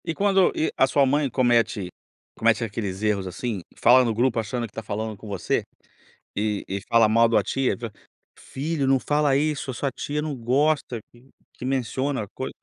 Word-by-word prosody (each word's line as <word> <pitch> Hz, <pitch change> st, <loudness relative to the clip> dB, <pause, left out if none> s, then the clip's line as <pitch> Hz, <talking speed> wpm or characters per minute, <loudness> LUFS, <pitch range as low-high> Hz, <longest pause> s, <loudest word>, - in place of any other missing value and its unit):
E 165 Hz, -, -2 dB
quando 195 Hz, -2 st, +3 dB
e 160 Hz, -, 0 dB
a 135 Hz, -, +4 dB
sua 140 Hz, +1 st, +3 dB
mãe 140 Hz, +1 st, +1 dB
comete 120 Hz, -6 st, +2 dB, 0.5 s
comete 115 Hz, +1 st, +2 dB
aqueles 100 Hz, -2 st, -4 dB
erros, 100 Hz, -3 st, 0 dB
assim, 100 Hz, +2 st, -4 dB, 0.2 s
fala 125 Hz, +2 st, +6 dB
no 115 Hz, -2 st, 0 dB
grupo 120 Hz, 0 st, +1 dB
achando 115 Hz, +2 st, -3 dB
que 105 Hz, -, -13 dB
tá -, -, -5 dB
falando 110 Hz, +1 st, -4 dB
com 105 Hz, -, -12 dB
você? 95 Hz, -4 st, -1 dB, 0.7 s
E 105 Hz, 0 st, -1 dB
e 100 Hz, +1 st, -3 dB
fala 115 Hz, -1 st, +5 dB
mal 115 Hz, +2 st, +5 dB
de 115 Hz, -, 0 dB
uma 105 Hz, -, +4 dB
tia, 135 Hz, +4 st, 0 dB
v 115 Hz, -1 st, -6 dB, 0.5 s
"filho, 145 Hz, +1 st, -3 dB
não 135 Hz, 0 st, +4 dB
fala 145 Hz, 0 st, +1 dB
isso. 145 Hz, -2 st, 0 dB
A -, -, -7 dB
sua 140 Hz, +3 st, -2 dB
tia 150 Hz, +2 st, -3 dB
não 150 Hz, -2 st, -3 dB
gosta 130 Hz, +1 st, +1 dB
q 120 Hz, +3 st, -21 dB, 0.3 s
que -, -, -8 dB
menciona, 130 Hz, -1 st, -1 dB
coi" 130 Hz, -, -4 dB
120 Hz, 195 wpm, -24 LUFS, 110-140 Hz, 0.7 s, fala